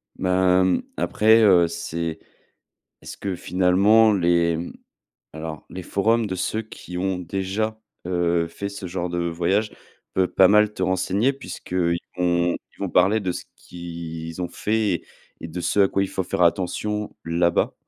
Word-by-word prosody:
Bah, 90 0 +3
hem, 95 0 +2 0.2
après, 110 +1 +4
heu, 90 -4 +6
c'est 85 -1 -4 0.8
est-ce - - -9
que 95 -2 -4
finalement 100 +5 +4
les 85 -3 +2 0.7
alors, 80 -1 -7
les 95 - -7
forums 110 +5 +1
de 95 - -3
ceux 110 +4 -2
qui 90 -4 -9
ont 95 0 -1
déjà, 100 +5 -3 0.3
heu, 85 -2 +1
fait 100 +4 -5
ce 100 -2 -7
genre 90 0 -3
de 85 0 -3
voyage 85 +5 0 0.4
peut 95 - +3
pas 95 -1 +5
mal 105 +1 +4
te 95 - -5
renseigner 95 +7 +1
puisqu'ils 90 -10 -2 0.2
vont 85 -1 +1 0.2
ils - - -27
vont - - -1
parler 105 +4 +3
de 95 -3 -2
ce - - -7
qu'ils 85 -1 -7
ont 90 - -2
fait 105 -5 -1 0.4
et 80 - -7
de 90 +3 -5
ce 100 - +1
à 95 - +5
quoi 95 - 0
il 95 - -1
faut 95 - -2
faire 90 0 -2
attention, 100 +4 0
là-bas. 85 +1 +1
90 Hz, 160 wpm, -23 LUFS, 85-100 Hz, 0.8 s, heu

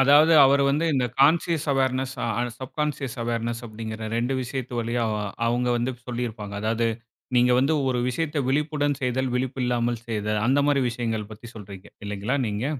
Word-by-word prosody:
அதாவது, 145 +4 +6
அவரு 140 +1 +4
வந்து 150 +4 +1
இந்த 130 -3 +2
அ - - -26
கான்ஷியஸ் 160 +1 +3
அவார்னஸ் 130 0 0 0.5
சப்கான்ஷியஸ் 140 -1 -3
அவார்னஸ் 115 0 -2
அப்டிங்கற, 110 0 -7 0.2
2 120 +3 0
விஷயத்து 130 0 -5
வழிய 115 +1 -2 0.5
அவங்க 120 +1 +1
வந்து 120 +2 -1
சொல்லி 125 0 -2
இருப்பாங்க. 105 -2 -8
அதாவது, 115 +1 +1 0.5
நீங்க 125 0 +5
வந்து 140 +4 +3
ஒரு 125 -1 0
விஷயத்த 150 +3 -1
விழிப்புடன் 145 0 0
செய்தல், 130 +1 0
விழிப்பில்லாமல் 125 -2 -1
செய்தல் 105 -2 -1
அந்த 135 +3 +3
மாரி 140 -2 +3
விஷயங்கள் 115 -3 -3
பத்தி 110 +3 -11
சொல்றிங்க 100 -3 -10 0.2
இல்லைங்களா, 105 +6 -2
நீங்க? 105 +4 -2
125 Hz, 155 wpm, -25 LUFS, 115-135 Hz, 0.5 s, அதாவது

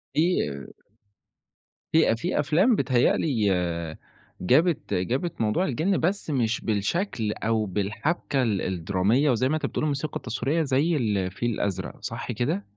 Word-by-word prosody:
في 150 - 0 1.2
في 160 0 +5
أ - - +2
في 150 +11 -2
أفلام 175 - +3
بيتهيأ 125 -10 +2
لي 125 -9 0 1.0
جابِت 155 - +2
جابِت 125 - -1
موضوع 110 - +1
الجِن، 165 +8 0
بس 185 +1 -1
مش 120 -5 0
بالشكل 110 - -1
أو 110 0 0
بالحَبْكَة 105 - -1
ال 105 -5 0
الدرامية، 95 - +1
وزي 130 +2 +1
ما 155 - +1
أنت 155 - -2
بتقول - - -2
الموسيقى 150 0 -2
التصويرية 135 +7 -1
زي 145 +4 +1
الفيل 105 -2 -1
الأزرق، 95 -3 -3
صح 115 +2 -5
كده؟ 110 -3 -1
125 Hz, 135 wpm, -26 LUFS, 105-155 Hz, 1.2 s, في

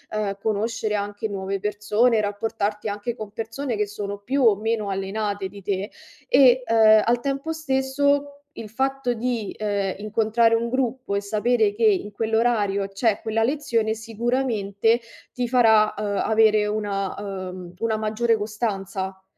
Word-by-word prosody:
uhm, 200 -2 -2
conoscere 220 0 -1
anche 205 +1 -3
nuove 195 -1 -3
persone, 210 +3 +1
rapportarti 210 0 -2
anche 205 +3 -3
con 215 -2 -7
persone 230 +3 -4
che 210 0 0
sono 205 0 -5
più 260 +6 -1
o 220 -4 +6
meno 215 0 -2
allenate 195 0 -2
di 200 0 -12
te 195 +1 -3 0.4
e, 260 -1 +6
uhm, 220 -1 +6
al 240 +1 +2
tempo 275 +4 -3
stesso 285 -1 0 0.2
il 225 - -7
fatto 265 +2 -1
di, 235 -3 -3
ehm, 200 -3 -1
incontrare 225 +2 +2
un 230 +1 0
gruppo 255 -3 -1
e 200 - 0
sapere 215 +1 +1
che 225 +2 +1
in 205 0 +2
quell'orario 220 -3 0
c'è 205 +2 0
quella 225 0 0
lezione 235 -5 0
sicuramente 225 -1 0 0.3
ti 245 -1 -2
farà, 225 -3 +4
uhm, 210 - -3 0.2
avere 215 -1 +4
una 205 -2 -2
uhm, 185 -3 -7
una 225 -1 0
maggiore 220 +2 +1
costanza. 195 -3 -4
215 Hz, 145 wpm, -23 LUFS, 205-235 Hz, 0.4 s, o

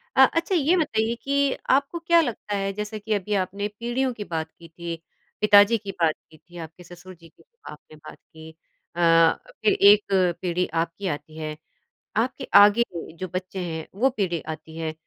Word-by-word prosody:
अच्छा 330 +7 +3
ये 325 +3 +3
बताइए 230 -7 0
कि 280 0 +1 0.2
आपको 280 +5 +1
क्या 335 0 +4
लगता 220 -6 -4
है 195 0 -2
जैसे 210 +1 -5
कि 215 +1 -3
अभी 205 +1 -2
आपने 200 +2 -2
पीढ़ियों 250 +2 -1
की 210 - -7
बात 160 -3 -4
की 170 - -16
थी, 170 0 -7 0.5
पिताजी 210 +2 +6
की 200 -2 -7
बात 160 -2 +3 0.2
की 155 - -16
थी, 175 +3 -16
आपके 165 +2 -10
ससुर 175 +2 -13
जी 165 -1 -18
की - - -25
जो 470 - -50
आपने 150 +1 -14
बात 150 - -13
की 160 0 -15 0.5
अ, 165 -1 +5 0.3
फिर 215 - +3
एक 205 +1 +6 0.4
पीढ़ी 180 0 -1 0.2
आपकी 170 +4 -7
आती 150 0 -6
है 155 -1 -5 0.6
आपके 255 +3 -1
आगे 205 +3 +7 0.3
जो 185 - -5
बच्चे 185 +1 -5
हैं 160 -3 -5
वो 265 +2 +4
पीढ़ी 185 -9 -2
आती 160 0 -8
है। 160 -1 -3
195 Hz, 185 wpm, -24 LUFS, 165-230 Hz, 0.6 s, आगे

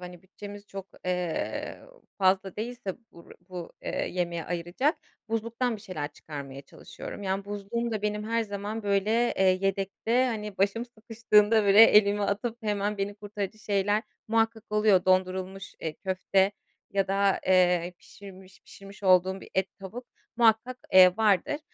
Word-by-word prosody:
hani, 180 0 -11
bütçemiz 205 +1 -11
çok, 195 -1 -8 0.2
eee, 180 -2 -3 0.4
fazla 190 0 +2
değilse 230 -3 -5 0.2
bur 170 - -16 0.2
bu, 180 -2 -7
eee, - - -2
yemeğe 170 -2 -2
ayıracak, 175 - -1 0.3
buzluktan 230 +2 -1
bir 205 - -15
şeyler 155 -8 -5
çıkarmaya 140 -3 -9
çalışıyorum. 200 - -10
Yani, 195 +1 -2
buzluğumda 210 +2 -3
benim 210 0 -2
her 230 0 +1
zaman, 205 +1 -5
böyle, 200 +1 +1 0.3
eee, 190 - +2 0.2
yedekte, 200 +6 0
hani, 210 -5 -4
başım 205 +4 +1
sıkıştığında, 225 -2 +2
böyle, 200 +2 +8
elimi 205 -1 +5
atıp 220 +4 -1
hemen 205 -1 -1
beni 200 +1 -2
kurtarıcı 205 0 -6
şeyler 205 +1 0 0.3
muhakkak 225 -1 +1
oluyor. 210 -3 +3
Dondurulmuş, 185 +1 0
eee, 160 - -3
köfte 190 +1 +1 0.4
ya 195 -1 0
da, 195 0 +2
eee, 180 -1 +3
pişirmiş 190 -1 -14
pişirmiş 200 +1 -14
olduğum 185 0 +3
bir - - -13
et, 190 0 +2
tavuk 225 +6 -8 0.3
muhakkak, 235 +2 +3 0.2
eee, 185 0 +8
vardır. 220 - +2
200 Hz, 140 wpm, -27 LUFS, 185-215 Hz, 0.4 s, böyle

